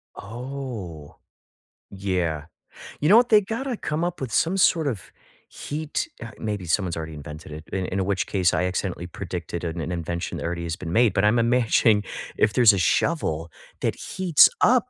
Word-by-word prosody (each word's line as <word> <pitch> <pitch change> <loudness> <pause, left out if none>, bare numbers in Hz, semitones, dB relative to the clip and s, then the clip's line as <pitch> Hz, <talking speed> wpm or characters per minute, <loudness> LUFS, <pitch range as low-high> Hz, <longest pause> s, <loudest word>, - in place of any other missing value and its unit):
Oh! 115 - -7 0.7
Yeah. 90 -6 -2 0.5
You 150 - +2
know 215 - +9
what, 245 0 +4
they 210 -2 +7
gotta 230 +4 -3
come 155 +3 -2
up 175 -4 -3
with 125 -4 -4
some 175 - +2
sort 165 -5 +3
of 105 - -4 0.4
heat 155 +1 -4
uh, 115 -1 -7
maybe 105 -4 -3
someone's 85 0 0
already 80 -1 -5
invented 75 +1 -9
it, 75 +1 -8
in 95 -1 -1
in 95 0 -1
which 100 -1 0
case, 90 -3 +2
I - - +1
accidentally 90 -1 -3
predicted 85 0 -5
an 85 0 -3
invention 85 0 -3
that - - -5
already 85 0 -3
has 85 0 -3
been 85 -2 -6
made, 115 -3 +4
but 95 - +1
I'm 115 +3 +4
imagining 115 -3 +3 0.3
if 110 - +3
there's 120 -4 +7
a 100 - 0
shovel 85 - +1 0.3
that - - 0
heats 180 -5 +4
up, 250 +1 +4
100 Hz, 175 wpm, -24 LUFS, 85-140 Hz, 0.7 s, know